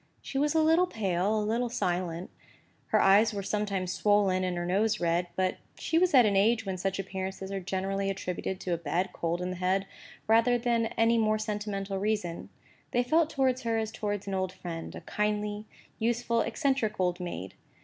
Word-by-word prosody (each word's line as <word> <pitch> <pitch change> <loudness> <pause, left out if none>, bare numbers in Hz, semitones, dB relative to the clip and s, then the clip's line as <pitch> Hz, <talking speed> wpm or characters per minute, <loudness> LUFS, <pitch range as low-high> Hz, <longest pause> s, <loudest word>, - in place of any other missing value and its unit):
She 270 - -4
was 295 +2 +1
a 320 - +4
little 325 +3 +4
pale, 200 - 0
a 210 - -1
little 235 +3 0
silent; 175 -5 -2 0.6
her - - +3
eyes 210 +3 +5
were 200 - -3
sometimes 195 -3 -1
swollen, 200 -3 +2
and 180 -1 -1
her 175 - -2
nose 210 +4 +1
red; 175 +1 +1
but 185 -1 0 0.2
she 325 - +1
was 360 -3 +3
at 250 -3 +8
an 205 -2 +2
age 225 +3 +3
when 190 -1 -3
such 190 +1 -2
appearances 190 0 -5
are 195 - -2
generally 195 +1 -2
attributed 185 -1 -3
to 180 - -1
a 170 - -1
bad 170 +4 -1
cold 170 +1 -2
in 180 - -2
the 185 - -5
head, 185 +2 +1 0.4
rather 230 +2 +4
than 235 -1 +1
to 225 - -6
any 230 +1 +4
more 215 -1 +2
sentimental 205 -2 -3
reason. 200 -5 -2 0.4
They 245 - +1
felt 315 +5 +3
towards 265 -4 +1
her 230 -2 0
as 220 -1 -2
towards 205 -2 -3
an 195 - -4
old 185 -1 -1
friend, 165 -2 -7
a - - -7
kindly, 210 0 -2 0.3
useful, 235 0 +1
eccentric 235 -3 0
old 180 -1 +1
maid. 170 - -5
205 Hz, 195 wpm, -29 LUFS, 185-225 Hz, 0.6 s, at